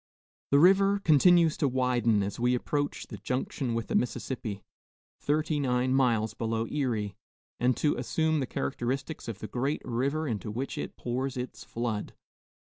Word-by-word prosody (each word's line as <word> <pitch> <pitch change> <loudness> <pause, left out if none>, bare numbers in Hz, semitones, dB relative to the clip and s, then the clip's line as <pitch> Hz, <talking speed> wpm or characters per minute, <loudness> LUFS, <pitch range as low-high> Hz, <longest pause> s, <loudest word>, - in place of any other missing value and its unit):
The 140 - +5
river 195 +5 +5
continues 170 -1 +5
to 145 - +2
widen 125 -5 +2
as 100 +3 -4
we 125 +1 +3
approach 145 +3 -2
the 105 - -8
junction 125 +3 -2
with 115 - -1
the - - -5
Mississippi, 120 -5 -2 0.6
thirty 150 +1 0
nine 130 -1 +1
miles 115 -5 +2
below 115 0 -1
Erie, 115 -8 -2 0.4
and 125 0 +2
to 150 - +2
assume 160 -1 +1
the 130 - -1
characteristics 125 - -3
of 115 -4 -4
the 110 - -6
great 130 +7 -2
river 140 +6 -1
into 110 -3 -3
which 125 +6 -3
it - - -5
pours 130 +2 -2
its 125 0 -5
flood. 115 -3 -3
125 Hz, 155 wpm, -29 LUFS, 115-145 Hz, 0.6 s, The